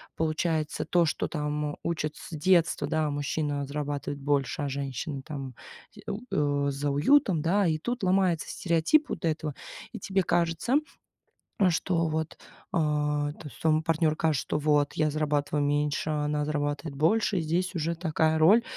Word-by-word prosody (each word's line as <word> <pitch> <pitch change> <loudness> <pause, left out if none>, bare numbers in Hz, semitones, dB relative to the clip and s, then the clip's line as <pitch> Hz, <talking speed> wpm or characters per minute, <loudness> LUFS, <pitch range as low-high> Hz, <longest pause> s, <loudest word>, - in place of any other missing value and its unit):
получается, 155 -1 -1
то, 170 +1 +3
что - - -1
там 150 -1 -3
учат 155 -2 -2
с - - -11
детства, 165 -3 +2
да- 155 -1 0
мужчина 145 0 -2
зарабатывает 145 -1 -3
больше, 145 0 0
а 140 - -1
женщина 135 +1 -4
там 135 -3 -6 0.4
з 210 - -12
у 205 +3 -5 0.5
э, - - +1
за 140 +1 -2
уютом, 180 - +3
да. 190 +3 +2
И 155 -1 +1
тут 240 +6 -4
ломается 185 -3 +2
стереотип 175 - +2
вот - - -5
этого. 155 -2 -1 0.4
И - - -7
тебе 190 0 0
кажется, 170 - +1 1.0
что 165 0 0
вот 160 0 -3 0.4
а, 150 -3 +1
то 155 - -12
есть - - -15
твоему 155 -1 +3
партнёру 155 -1 +1
кажется, 155 -5 +1
что - - -2
вот 145 -1 +2
я 155 -1 +1
зарабатываю 150 -1 0
меньше, 145 +1 0
а 150 -1 0
она 150 0 0
зарабатывает 145 0 -2
больше. 195 +6 +2
И - - 0
здесь 175 +3 -1
уже 165 +1 -1
такая 160 -1 +1
роль 200 +9 +6
155 Hz, 165 wpm, -28 LUFS, 145-170 Hz, 1.0 s, роль